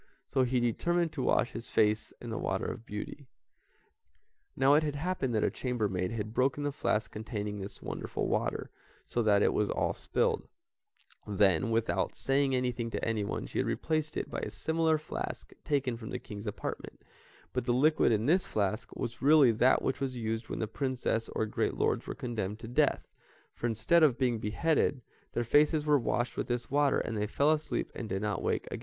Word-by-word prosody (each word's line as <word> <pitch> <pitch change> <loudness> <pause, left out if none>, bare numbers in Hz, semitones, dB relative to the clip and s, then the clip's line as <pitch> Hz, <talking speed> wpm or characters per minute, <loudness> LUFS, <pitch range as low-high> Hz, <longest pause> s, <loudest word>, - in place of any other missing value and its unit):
so 130 - +1
he 125 0 +1
determined 170 +8 +1
to 145 - -4
wash 125 - +2
his 115 0 -7
face 105 0 +2
in - - -7
the - - -3
water - - -1
of 115 - -5
beauty. 115 +6 -6 1.3
Now 135 +2 +5
it 150 - +6
had 150 -2 -2
happened 145 -6 -1
that 110 - +2
a - - +2
chamber 125 -4 -1
maid 90 -1 -1
had 110 -1 -4
broken 135 +4 +1
the 145 - 0
flask 110 -6 -1
containing 105 -2 -4
this 100 +1 -8
wonderful - - -3
water, - - -1 0.4
so 120 - 0
that 105 -2 +4
it - - +3
was 105 - +1
all - - 0
spilled; - - 0 0.8
then, 100 -1 +3
without 115 0 0
saying 135 0 +1
anything 125 -2 -1
to - - -3
anyone, 110 -3 -1
she - - -4
had - - +1
replaced 155 -1 -1
it - - -2
by - - -4
a - - -4
similar 160 0 +1
flask 155 - -6
taken 135 -4 0
from 110 -2 -8
the - - -3
King's 105 +1 -8
apartment, 105 - -5 0.5
but 125 - -1
the 120 - +1
liquid 145 +3 +4
in 110 0 +1
this 175 +7 +3
flask 105 +1 -2
was 120 +1 -5
really 145 -2 +7
that 125 +4 +3
which 135 - -1
was 130 -2 -2
used 110 0 -3
when - - -3
the 110 - -1
princes 125 -2 -1
or 110 - +1
great 105 - -1
lords - - 0
were - - -4
condemned 105 -4 -3
to 115 - -9
death, 140 +5 +1 0.4
for, 120 - -2
instead 115 +10 +3
of 140 -6 +5
being 125 -4 +1
beheaded, 135 +4 +1 0.3
their 120 - 0
faces 150 +5 +3
were 150 -2 +4
washed 120 0 -1
with - - -2
this 120 0 -3
water 145 0 +3
and 115 - -2
they 105 0 -1
fell 140 +7 +3
asleep 155 0 -1
and 115 - -6
did 95 +2 -2
not 105 -1 -1
wake - - 0
again. - - -4
120 Hz, 200 wpm, -31 LUFS, 110-145 Hz, 1.3 s, really